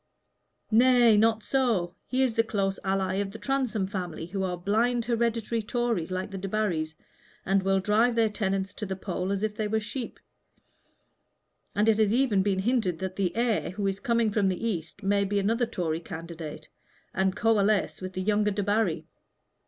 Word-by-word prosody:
"Nay, 240 0 +6
not 220 +1 +3
so. 230 -10 +1
He 260 +1 +1
is 255 -3 +1
the 225 - +3
close 195 -3 -1
ally 190 -1 0
of 200 0 -1
the 210 - -9
Transome 255 -7 -1
family, 180 -4 -5
who 190 +3 -4
are 180 -2 -1
blind 225 +6 +1
hereditary 230 -1 0
Tories 230 -6 -1
like 185 +2 -3
the 195 - -5
Debarrys, 185 -6 -1 0.5
and 195 +1 +2
will 195 0 +2
drive 220 +5 +2
their 230 -1 +4
tenants 195 -2 -2
to 210 - -5
the 190 - -3
poll 185 0 -3
as 200 +1 -1
if 215 -1 -1
they 215 0 -1
were 220 +1 +1
sheep, 230 +3 -6 1.6
and 210 +2 +2
it 220 -1 +4
has 215 0 +3
even 245 -7 +3
been 195 -1 +1
hinted 195 -4 +1
that 190 +1 -4
the 190 -2 -1
heir 235 -2 +1
who 200 +3 -4
is 195 0 -1
coming 235 -4 +1
from 200 -2 +2
the 190 +5 -2
East 180 -1 -4
may 200 +1 +2
be 200 +1 -1
another 225 +4 +1
Tory 165 -7 -2
candidate, 165 -2 -8 0.5
and 190 0 +1
coalesce 215 -3 +2
with 185 0 -5
the 185 - -3
younger 210 +1 +2
Debarry. 205 -2 0
205 Hz, 180 wpm, -27 LUFS, 190-225 Hz, 1.6 s, Nay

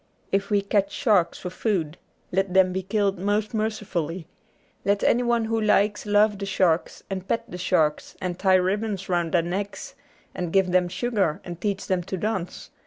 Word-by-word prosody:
If 195 0 0
we 205 -1 +2
catch 200 0 +1
sharks 200 -10 +2
for 180 - -6
food, 180 -7 -1 0.4
let 190 0 0
them 185 -1 +5
be 190 - -1
killed 195 0 0
most 205 +3 0
mercifully; 195 -6 -2 0.6
let 200 0 +1
anyone 240 -1 +2
who 225 0 0
likes 210 0 +2
love 205 0 +3
the 200 - -4
sharks, 180 -4 +1
and 190 -1 -5
pet 230 - -1
the 180 - -6
sharks, 160 -5 +1
and 180 -1 -4
tie 190 -1 +4
ribbons 195 +1 0
round 175 -2 0
their 170 -2 +3
necks 195 +3 -4 0.4
and 175 -2 -4
give 190 -1 +3
them 180 0 +3
sugar 190 -4 0
and 175 -1 -8
teach 200 -2 -2
them 185 -2 0
to 190 0 -4
dance. 190 -3 -3
195 Hz, 175 wpm, -25 LUFS, 180-210 Hz, 0.6 s, them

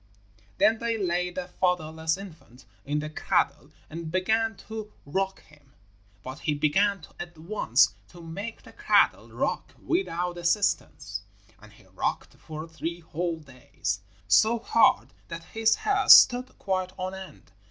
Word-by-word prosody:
Then 220 +1 +4
they 230 -1 -1
laid 180 -2 -1
the 185 -1 -4
fatherless 160 -3 0
infant 160 -10 -13 0.2
in 150 +1 -1
the 155 - -5
cradle - - 0 0.2
and 165 0 -7
began 220 +5 +1
to 220 -1 -6
rock 190 +6 -2
him, 145 -3 -23 0.5
but 130 +3 -7
he 150 - -1
began 195 +6 +2 0.2
at 175 -1 -8
once 160 - +2
to 175 - -15
make 195 +7 -7
the - - -14
cradle - - +3
rock - - -3
without 180 - -1
assistance, 100 - 0 0.4
and 105 0 -16
he 105 -2 -20
rocked 95 0 -3
for 155 +1 -8
three 165 +1 -5
whole 165 +1 -3
days, 125 - -5 0.3
so 220 - +5
hard 235 +3 +3
that 165 0 -7
his 225 +4 +2
hair 415 -2 0
stood 250 +1 +8
quite 185 -1 -2
on 185 0 -3
end. 185 - -11
175 Hz, 140 wpm, -27 LUFS, 155-200 Hz, 0.5 s, stood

